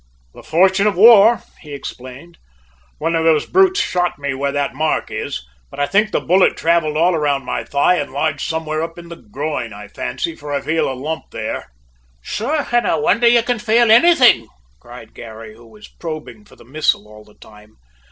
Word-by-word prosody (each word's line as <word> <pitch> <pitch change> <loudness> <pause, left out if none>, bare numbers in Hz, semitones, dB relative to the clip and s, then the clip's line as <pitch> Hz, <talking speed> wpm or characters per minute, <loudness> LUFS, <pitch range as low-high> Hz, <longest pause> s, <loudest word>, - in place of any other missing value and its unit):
"The - - -13
fortune 190 +5 +2
of 205 - 0
war," 220 +3 +6 0.2
he 150 -3 -11
explained. 135 +5 -10 0.6
"One 165 - -1
of 165 - 0
those 160 -2 +2
brutes 380 +1 +3
shot 180 -1 -1
me 140 -1 -3
where 140 +1 -2
that 145 0 -2
mark 155 +3 -2
is, - - -5 0.2
but - - -11
I 145 - +2
think 210 +7 +1
the - - -1
bullet 185 +3 +2
travelled 165 -2 +1
all 170 +2 +2
round 145 -4 -1
my - - -3
thigh 145 +6 +1
and 145 - -4
lodged 145 +1 -2
somewhere 160 -1 -3
in 170 0 -11
the 170 - -8
groin, 140 -2 -5
I 105 0 -10
fancy, 100 - -5
for 145 -2 -9
I 140 - -1
feel 160 -3 -1
a - - -5
lump 155 +5 -5
there." - - -6 0.5
"Sure, 275 - -3
I 240 -7 +2
wonder 200 +10 +2
you 235 0 +4
can 245 -1 -2
fale 230 +1 +3
anythin'!" 240 - +5 0.3
cried - - -13
Garry, 110 -1 -11
who 115 +1 -18
was 110 -2 -15
probing 165 +5 -9
for - - -19
the - - -18
missile 135 -5 -1
all 105 0 -15
the 105 - -22
time. 105 0 -18
155 Hz, 190 wpm, -18 LUFS, 135-195 Hz, 0.6 s, war